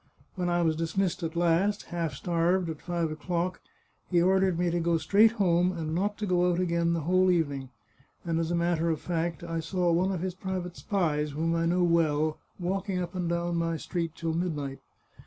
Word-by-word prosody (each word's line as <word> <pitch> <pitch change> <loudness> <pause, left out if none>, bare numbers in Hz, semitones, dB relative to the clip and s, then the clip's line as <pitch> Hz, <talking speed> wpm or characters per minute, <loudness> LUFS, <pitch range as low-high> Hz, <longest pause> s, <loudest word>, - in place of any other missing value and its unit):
When 180 -2 -2
I 175 0 +2
was 160 -1 +2
dismissed 165 +3 -1
at 165 0 -3
last, 175 +5 +2
half 165 -2 -2
starved, 175 0 +1
at 155 - -9
five 170 -2 -2
o'clock, 175 +3 -2 0.5
he 175 - +3
ordered 190 0 +3
me 175 0 +1
to 175 - 0
go 170 0 +2
straight 205 +8 +4
home, 180 -4 +2
and 160 -2 -3
not 200 +4 0
to 210 - -2
go 180 -1 +2
out 175 - 0
again 170 -1 +1
the 165 - -1
whole 185 +4 +3
evening. 145 -7 0 0.6
And 165 -1 0
as 165 -1 -1
a 175 - 0
matter 170 -1 +1
of 160 -2 0
fact 170 -1 -2
I 165 -1 -3
saw 175 +2 0
one 180 +3 +2
of 180 -4 -3
his 185 0 -2
private 185 -1 -4
spies, 150 -7 -1
whom 165 +3 0
I 165 0 +1
know 180 +1 +2
well, 155 -3 +2 0.2
walking 190 +2 -2
up 180 0 -3
and 180 -2 -2
down 170 0 -1
my 165 -1 0
street 165 0 -3
till 165 -1 -2
midnight. 150 -6 -2
170 Hz, 205 wpm, -28 LUFS, 165-180 Hz, 0.6 s, straight